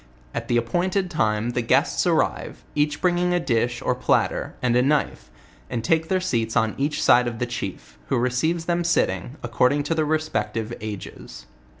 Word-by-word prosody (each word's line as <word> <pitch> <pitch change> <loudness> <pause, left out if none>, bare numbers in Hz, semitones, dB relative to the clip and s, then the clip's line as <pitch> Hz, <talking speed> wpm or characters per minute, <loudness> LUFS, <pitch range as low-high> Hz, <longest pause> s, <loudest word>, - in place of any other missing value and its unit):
At - - -4
the 120 - +2
appointed 175 - 0
time 110 -5 0
the 120 - -1
guests 115 - +2
arrive, - - 0
each 150 0 0
bringing 180 0 +2
a - - +2
dish 120 -5 0
or - - +1
platter, 125 - 0
and 120 -1 +1
a 125 - +5
knife, 140 - 0 0.4
and 115 - -3
take 160 +6 +2
their 190 +1 +1
seats 115 -11 -1
on 110 -1 +2
each 150 +2 0
side 125 0 +5
of 115 -1 -4
the 125 - -1
chief, 95 - -6
who - - +1
receives 140 +8 0
them 175 0 0
sitting, 130 - 0
according 125 +4 +2
to 150 - -1
their 160 -1 +1
respective 120 -8 -1
ages. 105 - -8
125 Hz, 180 wpm, -23 LUFS, 115-160 Hz, 0.4 s, a